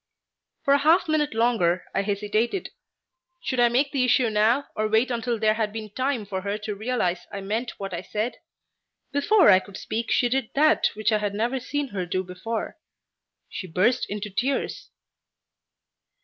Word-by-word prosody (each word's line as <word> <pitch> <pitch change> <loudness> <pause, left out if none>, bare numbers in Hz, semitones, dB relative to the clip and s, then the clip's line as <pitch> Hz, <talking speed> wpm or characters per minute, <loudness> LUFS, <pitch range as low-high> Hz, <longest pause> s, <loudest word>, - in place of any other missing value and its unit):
For 280 - +5
a 285 - +4
half 325 +5 +4
minute 300 -5 0
longer 225 -7 +2
I - - +1
hesitated. 210 - -1 0.7
Should 255 -6 -3
I 240 0 +5
make 270 +4 +1
the 270 -3 +1
issue 250 -2 +3
now 225 +6 +3
or 215 0 0
wait 220 +4 +2
until 235 0 -1
there 215 0 +3
had 215 -1 -1
been 215 -1 -7
time 255 -1 -1
for 190 -1 -4
her 200 +2 -2
to 210 0 -5
realize 200 -5 -2
I 200 -1 -5
meant 220 +5 -3
what 195 -2 -5
I 170 - -3
said? 215 +5 -3 0.7
Before 285 - +5
I 185 - +7
could 190 0 -11
speak 230 +1 -4
she 245 - +3
did 260 -2 -1
that 310 +2 +4
which 215 +1 0
I 215 - +2
had 205 -1 -2
never 240 +5 0
seen 285 +2 -3
her 190 -4 -4
do 185 +1 -1
before. 220 - -5 0.7
She 185 - -6
burst 195 +9 +1
into 210 0 -4
tears. 260 +7 -2
220 Hz, 175 wpm, -25 LUFS, 205-255 Hz, 0.7 s, I